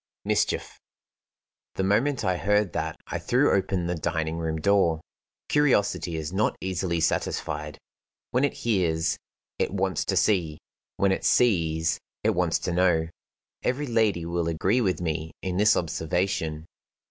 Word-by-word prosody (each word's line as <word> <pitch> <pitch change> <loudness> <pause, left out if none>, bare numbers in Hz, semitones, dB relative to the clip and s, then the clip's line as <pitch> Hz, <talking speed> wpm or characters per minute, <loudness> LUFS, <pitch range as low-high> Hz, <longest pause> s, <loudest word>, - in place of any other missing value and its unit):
Mischief!" - - 0 1.0
The 95 - -1
moment 115 +6 +1
I 90 -1 +2
heard 105 +1 +1
that 80 -1 -2
I - - -4
threw - - +2
open 95 -2 0
the 85 - -1
dining 80 0 -2
room 80 -1 -2
door. 85 -3 +3 0.5
Curiosity 100 - +2
is 80 +2 -4
not 105 +3 +1
easily 90 -2 -1
satisfied. 80 - -1 0.5
When 125 +3 +2
it 145 - +2
hears, 85 -7 +1 0.4
it - - 0
wants 95 -3 0
to - - 0
see; 85 -8 +2 0.4
when 100 -1 +3
it 95 - -1
sees, 80 -9 +2 0.2
it - - +3
wants - - +1
to - - -2
know. 85 -3 +2 0.5
Every 135 +4 -1
lady 110 - +1
will 85 0 -1
agree 95 +9 +1
with 95 -5 0
me 80 -1 -3
in 90 -1 -2
this 105 +2 +5
observation. 80 -1 -1
90 Hz, 145 wpm, -26 LUFS, 80-100 Hz, 1.0 s, this